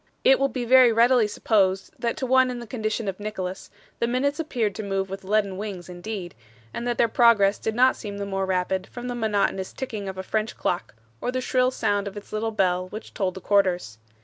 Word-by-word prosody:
It 270 - +6
will 275 - +3
be 255 -3 -4
very 255 0 +7
readily 235 0 +4
supposed 195 -3 +1
that 235 +4 -1
to 275 - -2
one 260 0 +4
in 250 - -4
the 240 - -7
condition 220 -1 -3
of 195 0 -3
Nicholas, 190 -3 -5 0.3
the 235 - +1
minutes 280 +5 0
appeared 240 -10 -1
to - - -5
move 195 -2 -2
with 195 - -6
leaden 200 -1 0
wings 195 -4 -6
indeed, 180 0 -6 0.4
and 240 - -4
that 240 -1 -1
their 235 - +4
progress 220 -4 +4
did 220 - -2
not 255 +2 +5
seem 205 -3 -7
the 200 - -3
more 195 -1 -2
rapid 185 0 -1
from 245 0 -7
the - - -2
monotonous 205 -4 0
ticking 215 -7 -5
of 190 - -7
a 190 - -4
French 215 +3 -2
clock, 175 -9 -2 0.3
or 245 - -1
the 255 - -1
shrill 255 0 +2
sound 205 -5 0
of 200 +1 -7
its 205 - -10
little 220 +1 -1
bell 185 -4 +1
which 215 +3 -9
told 185 -3 -1
the 190 - -8
quarters. 180 - +1
215 Hz, 225 wpm, -25 LUFS, 190-240 Hz, 0.4 s, very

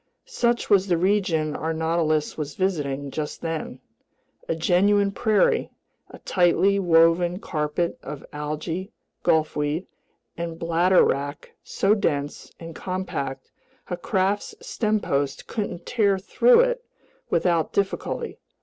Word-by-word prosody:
Such 240 - 0
was 195 -1 +4
the 175 -2 +2
region 170 -5 +1
our 160 +1 -2
Nautilus 160 -1 0
was 150 -2 -5
visiting 145 -7 -1
just 150 0 -4
then: 160 -6 -4 0.7
a - - +1
genuine 200 +4 +3
prairie, 215 0 +2 0.4
a - - -11
tightly 190 +2 +2
woven 170 0 +4
carpet 155 -2 -2
of 145 - -8
algae, 155 +6 -4 0.3
gulfweed, 155 +1 +1 0.5
and 170 -1 -5
bladder 170 +3 +3
wrack 145 +2 -2
so 195 +2 +1
dense 145 -9 -2
and 165 -1 -8
compact 160 -8 -4 0.4
a - - +1
craft's 195 +2 -1
stempost 200 - -1
couldn't 185 -6 -4
tear 205 -5 +2
through 470 - +4
it - - 0 0.5
without 170 -3 +1
difficulty. 200 - -2
170 Hz, 115 wpm, -24 LUFS, 155-200 Hz, 0.7 s, was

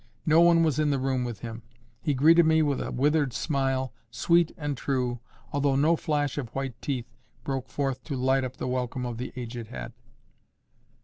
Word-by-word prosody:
No 160 +1 +5
one 170 -1 +6
was 155 -3 +1
in 150 -1 +2
the 140 - +2
room 130 -1 0
with 120 -4 -5
him. 115 -1 -6 0.4
He 150 -3 0
greeted 165 +6 +6
me 160 0 +4
with 145 -3 0
a - - -3
withered 145 0 +2
smile, 135 -4 -1 0.2
sweet 170 +7 +2
and 145 -2 -2
true, 125 -2 -1 0.3
although 140 -1 +2
no 155 +5 +4
flash 145 -3 -1
of 125 -5 -5
white 135 -1 -2
teeth 125 -4 -3 0.3
broke 135 -2 -3
forth 135 -3 -2
to 145 - -3
light 130 +1 +2
up 130 0 -5
the - - -3
welcome 125 0 -2
of 120 -1 -4
the 125 - -4
aged 120 -2 -6
head. 120 0 -7
135 Hz, 190 wpm, -27 LUFS, 125-150 Hz, 0.4 s, one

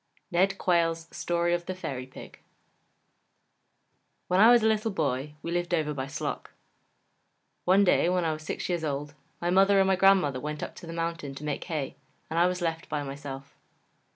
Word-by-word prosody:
NED 190 +3 +2
QUAYLE'S 165 -2 +1
STORY 175 0 0
OF 175 0 -2
THE 185 - -3
FAIRY 130 -8 -5
PIG 130 - -12 1.9
When 180 +1 +3
I 220 +3 +8
was 240 -2 +6
a - - +4
little 220 0 +1
boy, 150 -5 -2
we 170 - -4
lived 175 0 0
over 150 -2 -1
by 135 -2 -4
Sloc. 140 - -4 1.2
One 190 +3 +5
day, 180 -2 +3
when 180 -1 +1
I 160 - +1
was 155 - -7
six 155 - -4
years 175 -2 -1
old, 145 -1 -3 0.3
my 175 +1 -1
mother 195 +2 +5
and 195 - +5
my 190 - +4
grandmother 185 -8 +4
went 150 +2 -4
up - - -5
the 165 - -9
mountain 165 -4 -3
to 135 - -9
make 150 -2 -3
hay 155 -6 -4 0.3
and 165 - +1
I 175 - +5
was 180 0 -2
left 165 -1 -2
by 150 -1 -2
myself. 140 0 -8
170 Hz, 185 wpm, -28 LUFS, 150-180 Hz, 1.9 s, I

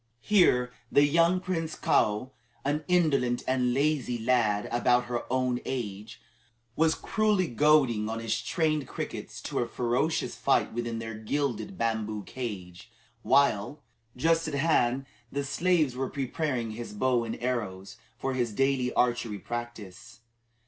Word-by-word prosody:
Here 125 -12 +3 0.2
the 140 - +6
young 170 +4 +3
Prince 165 -4 -3
Kaou, 105 +5 +1 0.3
an 150 +2 0
indolent 140 -9 +2
and 125 -1 +2
lazy 135 -2 +1
lad 110 -3 +1
of 120 - -2
about 125 0 +4
her 120 0 -4
own 130 -1 +1
age, 105 -5 -5 0.6
was 160 0 +3
cruelly 215 -4 +1
goading 130 -6 +3
on 115 - -3
his 115 0 -2
trained 155 +1 0
crickets - - -6
to - - -2
a 120 - 0
ferocious 125 +7 -1
fight - - +1
within 120 0 -3
their 115 0 -5
gilded 140 - -3
bamboo 110 -2 -1
cage, 100 -5 -7 0.3
while, 140 0 +2 0.3
just 165 +4 +2
at 150 - -3
hand, 135 -3 +2 0.3
the 140 0 -2
slaves 155 -1 +1
were 130 0 -2
preparing 130 -4 -2
his 115 0 -7
bow 125 +2 +1
and 115 -1 -4
arrows 105 -6 -3 0.2
for 135 +1 -2
his 120 -4 -1
daily 135 +1 +1
archery 120 -3 +1
practice. 115 -2 -7
125 Hz, 140 wpm, -28 LUFS, 115-145 Hz, 0.6 s, the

